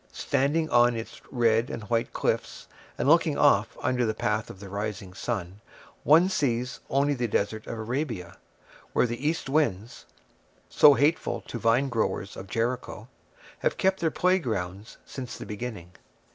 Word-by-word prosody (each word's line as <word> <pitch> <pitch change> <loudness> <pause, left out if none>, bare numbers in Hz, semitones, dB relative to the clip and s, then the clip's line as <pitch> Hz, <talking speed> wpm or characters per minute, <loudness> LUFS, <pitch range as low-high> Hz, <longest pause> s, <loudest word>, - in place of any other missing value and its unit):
Standing 155 +4 0
on 120 0 +5
its 115 0 -7
red 115 -1 +2
and 110 - -5
white 115 +2 -1
cliffs, - - -2 0.3
and - - -1
looking - - +4
off - - +3
under 125 -1 +1
the 110 -2 0
path 105 +1 -1
of 95 - -10
the 100 - -9
rising 100 -1 -5
sun, 100 -2 -4 0.4
one 165 +5 +6
sees 125 -9 -1
only 140 +2 +2
the 125 -3 -1
Desert 110 +1 -1
of 115 - -5
Arabia, 115 - -4 0.6
where - - +3
the 120 +4 -3
east 160 - -3
winds, 120 -7 -1 0.6
so 145 -2 +7
hateful 150 +4 +1
to 120 - -7
vinegrowers 115 -4 0
of 95 - -8
Jericho, 115 -1 -3 0.5
have - - 0
kept 190 0 +2
their 165 - +1
playgrounds 110 - -1
since 130 -3 -7
the - - -8
beginning. 105 -5 -6
120 Hz, 150 wpm, -27 LUFS, 105-135 Hz, 0.6 s, so